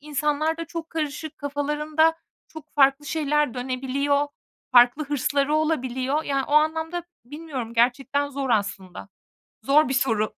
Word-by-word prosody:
insanlarda 300 +2 -1
çok 330 0 -7
karışık, 305 -1 -4
kafalarında 300 +3 0 0.3
çok 315 -1 -13
farklı 275 0 +3
şeyler 300 -3 0
dönebiliyor. 265 +3 -1 0.5
Farklı 245 +5 +5
hırsları 285 +1 0
olabiliyor. 285 -2 0
Yani, 275 -1 -1
o - - -7
anlamda 320 +3 +1 0.2
bilmiyorum 270 -4 -7
gerçekten 265 +4 +1
zor 275 -2 -4
aslında. 200 -4 -2 0.6
Zor 295 +1 +4
bir - - -1
soru. 225 -5 0
285 Hz, 120 wpm, -24 LUFS, 260-305 Hz, 0.6 s, Farklı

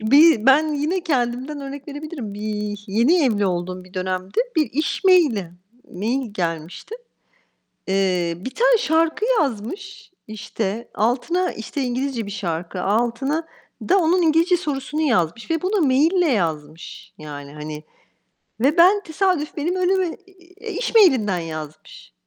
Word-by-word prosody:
Bir 275 +1 +5
ben 300 +3 +5
yine 310 +6 -1
kendimden 265 -1 -2
örnek 275 +1 -8
verebilirim. 290 -7 -6
Bir 210 -1 -4
yeni 245 - +3
evli 210 -6 +2
olduğum 180 0 -3
bir 185 - -18
dönemde 185 0 -3 0.2
bir 310 - +2
iş 305 +8 -2
mail'i, 295 - +4 0.4
mail 230 +5 -2
gelmişti. 170 - -4 0.9
Eee, 185 -3 0
bir 255 - -5
tane - - +3
şarkı 325 +6 +1 0.2
yazmış, 370 - -4 0.2
işte, 215 +1 -4
altına, 270 - 0
işte, 225 +6 -6
İngilizce 250 -2 -2
bir - - -6
şarkı. 180 -2 -4
Altına 240 +9 0 0.4
da 390 +3 +5
onun 350 +1 +3
İngilizce 330 +3 +3
sorusunu 295 -2 -3
yazmış 225 - 0
ve 325 0 0
bunu 375 -4 +1
mail'le 315 +5 +3
yazmış 160 -4 -4
yani, 145 -2 -9
hani. 150 0 -7 0.8
Ve 280 +7 +2
ben 385 +4 +6
tesadüf, 330 -2 -1
benim 340 +5 -1
önüme, 370 0 +1 0.2
eee, 380 +3 -11
iş 470 +5 -3
mail'inden 255 - +5
yazmış 155 - -8
260 Hz, 130 wpm, -21 LUFS, -, 0.9 s, ben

